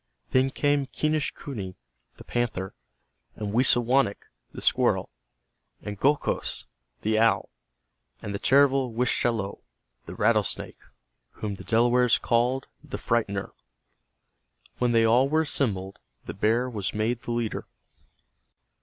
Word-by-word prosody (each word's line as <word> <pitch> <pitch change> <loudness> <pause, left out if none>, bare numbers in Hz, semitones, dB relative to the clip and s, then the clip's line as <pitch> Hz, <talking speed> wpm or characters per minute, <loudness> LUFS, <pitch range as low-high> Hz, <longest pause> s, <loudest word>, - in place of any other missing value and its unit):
Then 130 +1 +3
came 145 0 +1
Quenischquney, 140 -10 -3 0.4
the - - -11
panther, 110 -6 -2 0.6
and 105 -1 -4
Wisawanik, 120 -2 +3 0.3
the - - -8
squirrel, - - +2 0.7
and 105 -1 -6
Gokhos, 145 +2 0 0.4
the 110 0 +2
owl, 115 0 +2 0.7
and 100 - -6
the 100 - -3
terrible 135 -1 +3
Wischalowe, 115 -3 0 0.5
the - - -7
rattlesnake, 105 -7 0 0.5
whom 105 -2 -4
the 95 - -9
Delawares 120 +1 +3
called 125 +3 +1 0.2
"The - - -6
Frightener." 100 -4 -1 1.3
When 125 -1 +2
they 115 -1 +4
all 125 +4 +4
were 160 +2 +2
assembled, 100 -10 -2 0.3
the - - -5
bear 115 +5 +1
was 105 -7 -3
made 115 +3 -1
the - - -5
leader. 115 -2 -2
120 Hz, 115 wpm, -26 LUFS, 105-130 Hz, 1.3 s, they